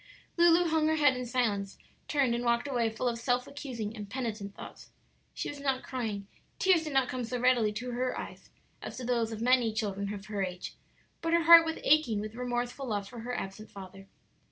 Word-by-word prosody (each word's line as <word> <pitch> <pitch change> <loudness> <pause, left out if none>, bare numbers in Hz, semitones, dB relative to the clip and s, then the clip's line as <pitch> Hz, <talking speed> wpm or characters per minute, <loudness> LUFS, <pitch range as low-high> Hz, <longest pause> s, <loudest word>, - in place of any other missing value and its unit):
Lulu 345 0 +5
hung 315 -1 +2
her 315 - +2
head 290 -4 +4
in 250 0 -4
silence, 210 -6 -1 0.3
turned, 275 -5 +2
and 240 +1 -1
walked 235 +2 +1
away 240 -4 +1
full 220 +3 -3
of 235 -1 -1
self 245 +1 0
accusing 235 -7 -6
and 205 -2 -7
penitent 220 -6 -4
thoughts. - - -11 0.5
She - - -3
was 290 - -6
not 270 -2 -1
crying; 220 -6 -4 0.3
tears 360 -4 +3
did 305 - -4
not 265 -2 +3
come 250 0 -3
so 245 +2 -3
readily 245 -4 +3
to 245 +4 -4
her 250 +1 -1
eyes - - -9 0.3
as - - -7
to 255 - -6
those 235 -2 0
of 220 0 -6
many 250 -2 +4
children 200 -2 -2
of 200 -1 -7
her 205 -1 -2
age, 180 -1 -5 0.5
but 330 0 -1
her 335 0 +4
heart 335 0 +9
was 320 - -2
aching 270 -8 +3
with 215 +1 -5
remorseful 245 +2 -3
love 205 -3 -2
for 240 +2 -10
her 245 +2 -4
absent 205 +3 -7
father. 195 0 -11
245 Hz, 210 wpm, -30 LUFS, 215-270 Hz, 0.5 s, heart